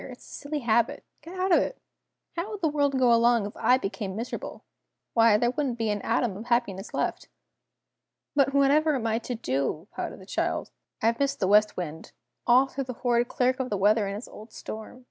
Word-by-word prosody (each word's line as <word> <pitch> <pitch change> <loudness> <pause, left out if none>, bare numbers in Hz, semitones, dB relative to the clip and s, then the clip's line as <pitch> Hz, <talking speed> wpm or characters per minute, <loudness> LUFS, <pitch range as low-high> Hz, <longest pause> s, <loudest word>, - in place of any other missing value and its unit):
It's 250 - -12
a - - -10
silly 295 +1 -4
habit! 235 -1 +1 0.2
Get 340 +5 -10
out 375 +1 +1
of - - +7
it. - - -2 0.6
How 340 +5 -3
would 420 -2 -6
the 325 - +3
world 285 -2 +1
go 250 -2 +5
along 235 -2 +4
if 205 - -7
I 250 - +4
became 195 -4 -4
miserable? 230 +3 -6 0.5
Why 225 -2 +5
there 240 +2 +1
wouldn't 265 -3 -2
be 225 -2 0
an 205 -1 -2
atom 230 -6 0
of 215 +4 -8
happiness 235 -5 -1
left!" - - -2 1.1
"But 275 -1 +3
whatever 285 +2 +3
am 240 -4 -2
I 225 0 +1
to 245 +1 -5
do?" 145 - -2
pouted - - -5
the - - -13
child. - - -2 0.3
"I've 230 +1 +2
missed 280 0 0
the 190 - +1
West 210 +2 +4
Wind 160 -3 -6 0.3
all 250 +2 +6
through 270 0 -5
the 255 - -5
horrid 240 0 +3
Clerk 255 +2 +1
of 255 -1 -2
the 205 - -1
Weather 205 +2 +3
and 200 - -3
his 210 - -7
old 215 +2 -12
storm! 220 +3 -8
235 Hz, 210 wpm, -27 LUFS, 210-275 Hz, 1.1 s, of